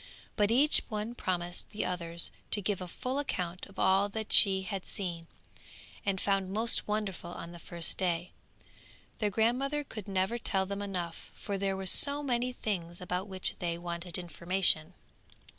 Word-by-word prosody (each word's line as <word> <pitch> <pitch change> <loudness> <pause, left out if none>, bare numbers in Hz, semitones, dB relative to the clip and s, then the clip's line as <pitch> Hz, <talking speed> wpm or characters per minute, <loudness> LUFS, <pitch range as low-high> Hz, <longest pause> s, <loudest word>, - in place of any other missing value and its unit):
But 205 -1 +2
each 275 +6 +6
one 215 +2 -3
promised 175 -5 -3
the 210 - -3
others 170 -1 -1 0.2
to - - +4
give 200 -1 -1
a 180 - -4
full 255 +9 -3
account 180 -10 -3
of 195 - -18
all 195 +2 +3
that 220 +1 -3
she 190 -2 +8
had 195 -1 -4
seen, 170 -4 -5 0.8
and 195 -2 0
found 195 -1 0
most 225 +3 +3
wonderful 210 -4 -2
on 170 -1 -7
the 170 - -10
first 170 0 +2
day. 175 -2 0 0.9
Their 210 - +1
grandmother 255 +8 +1
could 215 -7 -8
never 195 +4 0
tell 195 -4 +1
them 200 +1 -4
enough, 180 -4 -5
for 200 - -4
there 195 0 0
were 190 - -5
so 285 +9 +3
many 250 -2 0
things 175 -8 -3
about 180 +1 -3
which 190 -2 -2
they 170 -1 -1
wanted 170 0 -1
information. 175 -1 +1
190 Hz, 165 wpm, -31 LUFS, 175-215 Hz, 0.9 s, she